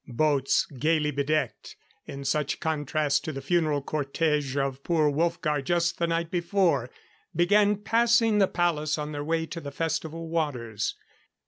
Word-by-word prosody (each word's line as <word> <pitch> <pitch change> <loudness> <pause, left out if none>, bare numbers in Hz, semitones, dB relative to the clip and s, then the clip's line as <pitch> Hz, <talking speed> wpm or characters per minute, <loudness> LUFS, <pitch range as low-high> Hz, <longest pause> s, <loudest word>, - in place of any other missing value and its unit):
Boats 140 +1 +2
gayly 155 0 +2
bedecked 145 -1 -2 0.3
in 140 0 -7
such 145 +1 0
contrast 150 -2 0
to 160 - -3
the 135 - -5
funeral 150 0 +1
cortege 145 -1 -1
of 135 -1 -2
poor 155 -4 +2
Wolfgar 165 -1 0
just 170 +4 0
the 170 - +1
night 165 0 -1
before 170 -7 +1 0.5
began 205 +4 +4
passing 225 +1 +3
the 195 - +5
palace 160 -4 0
on 150 0 -4
their 145 -1 -4
way 160 +1 0
to 165 +1 -7
the 145 - -6
festival 165 +2 -3
waters. 125 -10 -2
155 Hz, 145 wpm, -27 LUFS, 145-170 Hz, 0.5 s, the